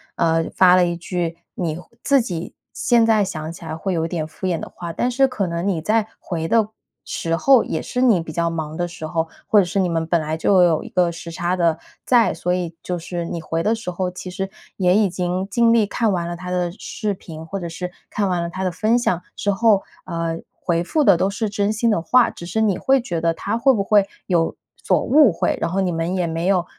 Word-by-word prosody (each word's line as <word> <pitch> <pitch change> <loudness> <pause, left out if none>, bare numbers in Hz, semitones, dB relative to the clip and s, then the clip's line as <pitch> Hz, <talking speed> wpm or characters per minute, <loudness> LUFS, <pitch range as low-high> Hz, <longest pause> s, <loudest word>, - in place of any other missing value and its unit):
呃， 165 0 +2
发 185 -1 +6
了 180 - +5
一 170 - -2
句， 170 -1 -3 0.2
你 165 -3 -2 0.2
自 275 -1 +4
己 175 -7 -5 0.2
现 235 -2 +3
在 220 -2 +4
想 155 -3 -5
起 170 0 -11
来 155 -1 -4
会 190 +4 -2
有 165 -1 0
点 165 -2 -3
敷 175 +4 -6
衍 170 -3 -1
的 - - -7
话， 170 -1 -6
但 245 +8 0
是 270 +2 +4
可 255 -7 -2
能 170 +1 -2
你 175 -5 0
在 215 +4 +1
回 165 -3 -3
的 220 +2 +2 0.4
时 165 0 -1
候， 260 +7 +5
也 - - -3
是 250 - -2
你 235 -8 +5
比 165 -1 -6
较 170 +1 0
忙 160 -2 -4
的 175 +1 -1
时 165 -2 -8
候， 165 +1 -1 0.2
或 210 - +5
者 195 - +3
是 185 +3 -1
你 185 - +2
们 165 -1 -1
本 170 +1 +2
来 155 0 -2
就 185 +2 +4
有 165 -3 +3
一 - - -9
个 180 -2 +2
时 170 0 -8
差 175 +2 -1
的 170 -3 +2 0.3
在。 240 -3 +4
所 180 - -2
以 175 -2 -2
就 180 - -3
是 170 0 -4
你 170 - -4
回 165 0 -2
的 215 +6 +2
时 220 -5 -5
候， 180 +1 -2
其 180 0 -8
实 195 +1 -4 0.3
也 180 -1 +3
已 215 -1 +4
经 180 +1 -2
尽 230 +3 +3
力 230 -2 +4
看 220 +2 0
完 175 -3 -1
了 175 - -4
他 180 +1 -7
的 180 -1 -1
视 210 +2 -4
频， 160 -4 -10
或 195 +4 -5
者 170 -2 -5
是 180 +2 -5 0.2
看 205 -2 -1
完 180 -2 0
了 170 - -3
他 185 +2 -5
的 185 - 0
分 215 +7 +2
享 185 -8 0
之 205 - 0
后， 205 0 +3 0.2
呃， 165 -1 -2
回 170 -2 -1
复 300 - +1
的 200 -8 +6
都 185 +3 +1
是 210 +3 -2
真 205 0 0
心 225 +2 +1
的 190 - +1
话。 245 +7 +4
只 170 - -9
是 220 - -2
你 215 -4 +2
会 270 +8 +3
觉 175 -9 -3
得 165 0 +1
他 205 +5 -2
会 250 +4 +4
不 200 - 0
会 200 -1 +4 0.2
有 170 -3 +1 0.3
所 - - +3
误 290 -5 +5
会？ 165 - 0
然 - - 0
后 195 +2 +1
你 185 -2 0
们 165 +2 -1
也 180 -2 0
没 165 +1 -2
有 185 -3 +2
180 Hz, 270 characters per minute, -21 LUFS, 170-205 Hz, 0.4 s, 发